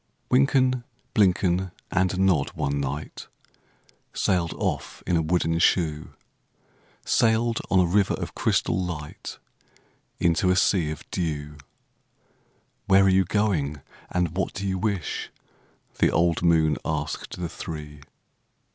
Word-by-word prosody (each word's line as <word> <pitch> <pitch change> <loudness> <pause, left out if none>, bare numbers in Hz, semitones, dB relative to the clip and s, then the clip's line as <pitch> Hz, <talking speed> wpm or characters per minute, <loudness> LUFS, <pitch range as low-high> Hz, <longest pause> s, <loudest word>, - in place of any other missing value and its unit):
Wynken, 130 -1 +3 0.3
Blynken, 95 -2 +2 0.2
and 95 0 +1
Nod 95 -7 +2
one 70 0 -1
night 70 +2 -5 0.9
Sailed 85 -3 +1
off - - -3
in 90 - +1
a 80 - +3
wooden 80 0 +1
shoe,— 80 -4 +1 0.9
Sailed 115 0 +2
on 95 - +4
a 90 - +5
river 100 +3 +2
of - - -6
crystal - - +1
light 75 -4 -6 0.8
Into 85 +2 +2
a 90 - +4
sea 90 -4 +2
of 75 -2 -6
dew. 75 -4 -3 1.3
"Where 95 0 +6
are 95 - +4
you 95 0 +4
going, 85 -8 0 0.3
and 90 -2 -1
what 95 -2 -2
do 100 0 -4
you 95 -1 -1
wish?" 100 -4 -2 0.7
The - - +4
old 85 -1 +2
moon 80 -3 +3
asked 75 +2 -4
the 90 - -2
three. 75 -3 -8
90 Hz, 125 wpm, -25 LUFS, 80-95 Hz, 1.3 s, Where